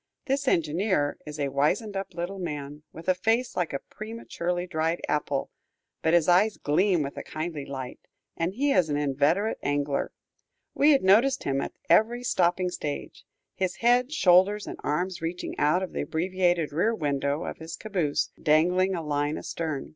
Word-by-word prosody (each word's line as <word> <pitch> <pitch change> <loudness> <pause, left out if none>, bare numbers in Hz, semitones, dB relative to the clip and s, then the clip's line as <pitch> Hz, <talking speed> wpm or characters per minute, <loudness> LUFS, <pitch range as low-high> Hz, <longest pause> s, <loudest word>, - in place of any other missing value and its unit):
This 275 0 -1
engineer 165 - +1
is 150 0 -7
a 140 -1 0
wizened 170 +10 0
up 195 -2 -5
little 180 +3 -4
man, 150 -4 -5
with 165 - -11
a 185 - +5
face 225 +7 0
like 175 -3 -1
a 140 - -1
prematurely 180 -3 -5
dried 165 -1 -1
apple, 145 -2 -1 0.5
but 160 +1 +3
his 170 -3 +3
eyes 195 +5 +4
gleam 175 +2 +2
with 140 - -6
a - - -5
kindly 155 -2 -5
light, 130 -2 -6 0.4
and 175 +3 -2
he 280 +4 +1
is 180 - +3
an 145 - 0
inveterate 145 +9 +1
angler. 145 0 -1 0.6
We 290 - +4
had 280 -3 +5
noticed 230 +8 +4
him 135 0 0
at - - -5
every 240 +3 +3
stopping 180 -4 +1
stage, 145 -4 -5 0.3
his 185 -1 -2
head, 245 +3 +3
shoulders, 200 - +4
and - - -7
arms 175 +4 -1
reaching 170 +2 -4
out 155 +6 +3
of 185 - -5
the - - -2
abbreviated 175 -2 0
rear 215 +9 +1
window 145 -2 -1
of - - -5
his 160 0 -7
caboose, 180 -9 -1
dangling 180 +5 +3
a 165 - -4
line 145 0 -1
astern. 155 -5 -4
175 Hz, 170 wpm, -27 LUFS, 150-195 Hz, 0.6 s, a